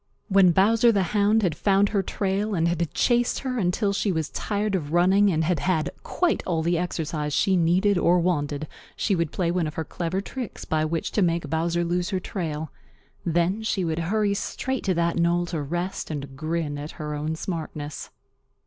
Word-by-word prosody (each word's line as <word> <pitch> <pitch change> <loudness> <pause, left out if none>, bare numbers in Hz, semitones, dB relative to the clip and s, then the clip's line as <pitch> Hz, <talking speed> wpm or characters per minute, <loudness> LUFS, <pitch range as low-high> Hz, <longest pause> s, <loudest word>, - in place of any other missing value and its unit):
When 195 -2 +6
Bowser 225 +7 +4
the 200 -3 +2
Hound 210 +1 +3
had 175 -4 +2
found 200 +4 +2
her 200 -2 +1
trail 200 +2 -1
and 165 -1 +2
had 170 -1 -1
chased 240 -1 +1
her 255 -2 -2
until 200 +2 +1
she 200 0 0
was 160 -4 -1
tired 205 0 -2
of 155 -5 -2
running 190 +4 +4
and 160 -1 +1
had 170 -1 +1
had 160 -3 0
quite 355 -2 0
all 165 -3 0
the 170 +2 +1
exercise 155 -4 -2
she 190 +5 +3
needed 180 +3 +3
or 175 +1 +4
wanted, 155 -4 0 0.3
she 205 - 0
would 170 -3 -1
play 170 -2 0
one 175 -2 0
of 150 - -6
her 160 - -3
clever 175 +2 -3
tricks 235 +3 -6
by 155 0 0
which 165 +1 -2
to 210 - +1
make 170 -3 0
Bowser 170 +2 0
lose 175 +1 -1
her 190 -3 -1
trail. 160 -5 -4 0.6
Then 175 +5 +1
she 205 -4 -1
would 160 0 -1
hurry 210 -1 +2
straight 260 +5 -3
to 185 -2 +1
that 170 0 +1
knoll 170 +1 +2
to 170 -3 -3
rest 175 +6 -3
and 140 -3 -5
grin 155 0 -2
at 150 +2 -7
her 150 -1 -5
own 155 +2 -2
smartness. 155 -4 -5
175 Hz, 195 wpm, -25 LUFS, 160-195 Hz, 0.6 s, When